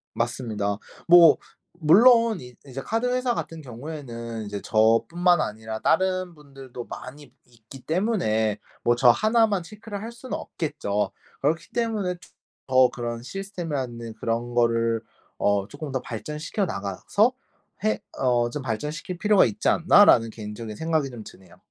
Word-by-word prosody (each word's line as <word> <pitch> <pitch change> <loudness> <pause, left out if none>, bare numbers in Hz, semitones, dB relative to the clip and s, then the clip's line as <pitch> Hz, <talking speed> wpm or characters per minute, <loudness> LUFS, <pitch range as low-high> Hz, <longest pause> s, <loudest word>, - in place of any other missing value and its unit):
맞습니다. 110 -4 -2 0.3
뭐 170 -1 +8 0.4
물론 230 +5 +6
이 125 0 -12
이제 135 0 -6
카드 225 - -1
회사 250 -1 +1
같은 165 -5 -5
경우에는 120 -4 -7
이제 100 0 -5
저뿐만 155 - +3
아니라 110 -1 -4
다른 185 +5 +1
분들도 135 -4 -10
많이 140 +1 -10
있기 120 +2 -15
때문에 135 - 0 0.3
뭐 120 - +4
저 125 -1 +6
1 220 - +3
만 200 -4 -1
체크를 210 +3 -8
할 230 +2 -6
수는 240 +2 -6
없겠죠. 145 - -3 0.3
그렇기 155 +2 0
때문에 220 -6 -1 0.5
더 130 -1 +5
'그런 120 -1 -5
시스템이라는 140 - -5
그런 115 +2 -3
거를 115 -1 +2 0.4
어 100 -1 +1
조금 145 0 -7
더 130 - -2
발전시켜 150 - -4
나가서 170 - 0 0.5
해 215 - +1 0.2
어 120 -2 +2
좀 140 +3 -5
발전시킬 150 +9 -4
필요가 210 -1 +5
있지 105 -3 -1
않나.'라는 170 - +6
개인적인 105 0 -7
생각이 160 -2 0
좀 115 -4 -9
드네요. 90 -2 -15
135 Hz, 300 characters per minute, -25 LUFS, 115-180 Hz, 0.5 s, 뭐